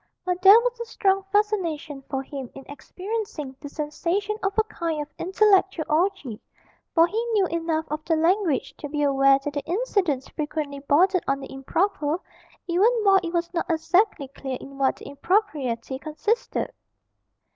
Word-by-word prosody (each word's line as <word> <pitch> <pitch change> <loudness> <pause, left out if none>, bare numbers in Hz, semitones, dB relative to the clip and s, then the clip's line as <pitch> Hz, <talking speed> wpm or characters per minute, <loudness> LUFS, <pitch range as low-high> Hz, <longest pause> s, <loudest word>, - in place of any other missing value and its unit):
But 360 0 -1
there 395 +4 +9
was 485 -1 -2
a 470 - -4
strong 390 -3 +1
fascination 335 -9 0
for 270 0 -2
him 270 -2 -7
in 270 - -10
experiencing 365 -3 -5
the 290 - -8
sensation 340 +8 -2
of 390 +1 -2
a 440 - +5
kind 335 -7 -3
of 295 0 -6
intellectual 385 -2 +3
orgie, 305 - 0 0.6
for 330 -1 +7
he 435 +6 -2
knew 405 -3 +3
enough 330 -2 -1
of 305 0 -3
the 330 - +2
language 335 -1 +1
to 290 - -7
be 295 0 -1
aware 275 -1 +5
that 290 - -3
the 285 - -3
incidents 360 - 0
frequently 295 -2 -4
bordered 350 +7 +3
on 275 0 +1
the 270 - -9
improper, 305 +3 -1 0.5
even 370 +6 +3
while 390 -1 +6
it 340 -2 -4
was 340 0 -2
not 335 - -2
exactly 335 -1 +2
clear 265 -1 -5
in 275 0 -11
what 270 -1 +2
the - - -13
impropriety 280 - -1
consisted. 325 - -2
330 Hz, 165 wpm, -25 LUFS, 285-390 Hz, 0.6 s, there